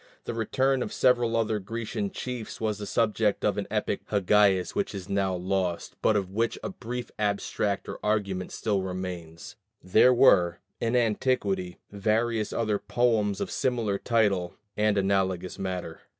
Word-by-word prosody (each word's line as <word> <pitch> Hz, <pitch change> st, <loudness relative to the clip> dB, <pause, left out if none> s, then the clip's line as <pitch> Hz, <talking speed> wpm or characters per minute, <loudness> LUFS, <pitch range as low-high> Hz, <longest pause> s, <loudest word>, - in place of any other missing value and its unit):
The -, -, -3 dB
return 130 Hz, +4 st, +1 dB
of -, -, -3 dB
several 120 Hz, -3 st, +3 dB
other 110 Hz, -1 st, 0 dB
Grecian 110 Hz, 0 st, -4 dB
chiefs 125 Hz, -1 st, -6 dB
was 105 Hz, -2 st, -1 dB
the 105 Hz, -, -5 dB
subject 110 Hz, -2 st, +1 dB
of -, -, +1 dB
an -, -, -4 dB
epic -, -, -2 dB
poem 100 Hz, -2 st, 0 dB
by 105 Hz, 0 st, +6 dB
Hagias 90 Hz, -1 st, -3 dB
which 200 Hz, -, -2 dB
is 95 Hz, -2 st, -6 dB
now 95 Hz, -1 st, 0 dB
lost, 90 Hz, -1 st, -2 dB
but 110 Hz, -, +3 dB
of 95 Hz, -2 st, -1 dB
which 115 Hz, +3 st, 0 dB
a -, -, -2 dB
brief 125 Hz, -6 st, -6 dB
abstract 100 Hz, -1 st, -1 dB
or -, -, -6 dB
argument 100 Hz, -3 st, -1 dB
still 105 Hz, -3 st, -1 dB
remains: 90 Hz, -1 st, -6 dB, 0.2 s
there 95 Hz, +7 st, +5 dB
were 95 Hz, -9 st, +5 dB, 0.2 s
in 115 Hz, +1 st, 0 dB
antiquity 105 Hz, -6 st, 0 dB
various 110 Hz, +2 st, 0 dB
other 110 Hz, -3 st, 0 dB
poems 110 Hz, -5 st, +1 dB
of -, -, -3 dB
similar 115 Hz, -6 st, 0 dB
title 100 Hz, -7 st, +1 dB, 0.2 s
and 105 Hz, -1 st, +2 dB
analogous 95 Hz, -2 st, 0 dB
matter. 90 Hz, -4 st, -4 dB
105 Hz, 160 wpm, -27 LUFS, 95-115 Hz, 0.2 s, by